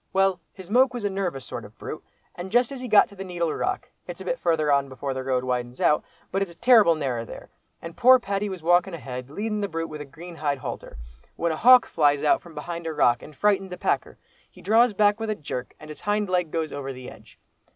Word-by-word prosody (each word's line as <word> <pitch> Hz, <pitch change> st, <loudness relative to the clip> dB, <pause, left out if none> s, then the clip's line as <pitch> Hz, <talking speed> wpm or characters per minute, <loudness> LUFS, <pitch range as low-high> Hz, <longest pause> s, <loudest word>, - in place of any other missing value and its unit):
Well, 195 Hz, -1 st, +2 dB
his 190 Hz, 0 st, -12 dB
moke 255 Hz, +2 st, +4 dB
was 235 Hz, -4 st, -4 dB
a 200 Hz, -, 0 dB
nervous 180 Hz, -9 st, -3 dB
sort -, -, -6 dB
of -, -, -14 dB
brute, -, -, -7 dB, 0.3 s
and 180 Hz, +2 st, -7 dB
just 245 Hz, +2 st, +3 dB
as 270 Hz, -2 st, -7 dB
he 255 Hz, -, -5 dB
got 215 Hz, -3 st, +6 dB
to 200 Hz, -, -15 dB
the 195 Hz, -, -6 dB
Needle 175 Hz, -3 st, -2 dB
Rock, 380 Hz, 0 st, -3 dB, 0.2 s
it's -, -, -7 dB
a -, -, -8 dB
bit -, -, -2 dB
farther 155 Hz, -3 st, +1 dB
on 140 Hz, -1 st, +2 dB
before 135 Hz, +1 st, -4 dB
the 130 Hz, 0 st, -4 dB
road 130 Hz, -1 st, 0 dB
widens 125 Hz, -1 st, -3 dB
out, 150 Hz, -, +3 dB, 0.3 s
but 195 Hz, -, 0 dB
it's 175 Hz, -4 st, -3 dB
terrible 220 Hz, -4 st, +5 dB
narrer 130 Hz, -6 st, -2 dB
there, -, -, -11 dB, 0.3 s
and 165 Hz, 0 st, -8 dB
poor 255 Hz, +2 st, +7 dB
Paddy 200 Hz, -3 st, -2 dB
was 185 Hz, -4 st, -7 dB
walking 175 Hz, +2 st, +3 dB
ahead 125 Hz, -4 st, -7 dB
leadin' 210 Hz, +6 st, -3 dB
the 200 Hz, -, -1 dB
brute 165 Hz, -2 st, -4 dB
with 150 Hz, -1 st, -7 dB
a -, -, -6 dB
green 165 Hz, +4 st, -11 dB
hide 145 Hz, -2 st, -1 dB
halter, 130 Hz, -, -7 dB, 0.4 s
when 170 Hz, 0 st, -1 dB
a -, -, -1 dB
hawk 250 Hz, +7 st, +7 dB
flies 145 Hz, -3 st, +2 dB
out 150 Hz, -, +3 dB
from 170 Hz, -2 st, -14 dB
behind 170 Hz, +2 st, -5 dB
a 160 Hz, -, -3 dB
rock 120 Hz, -5 st, +3 dB
and 150 Hz, -, -12 dB
frightened 195 Hz, +2 st, +1 dB
the 180 Hz, -, -7 dB
packer. -, -, -1 dB, 0.3 s
He -, -, -17 dB
draws 225 Hz, +2 st, +4 dB
back 205 Hz, +1 st, +3 dB
with 225 Hz, 0 st, -3 dB
a 215 Hz, -, 0 dB
jerk, 135 Hz, -7 st, -6 dB
and 155 Hz, -, -12 dB
his 155 Hz, -, -10 dB
hind 205 Hz, 0 st, 0 dB
leg 180 Hz, -3 st, +1 dB
goes 160 Hz, -1 st, -3 dB
over 135 Hz, -1 st, -5 dB
the 130 Hz, -1 st, -9 dB
edge. -, -, -17 dB
170 Hz, 250 wpm, -25 LUFS, 145-205 Hz, 0.4 s, poor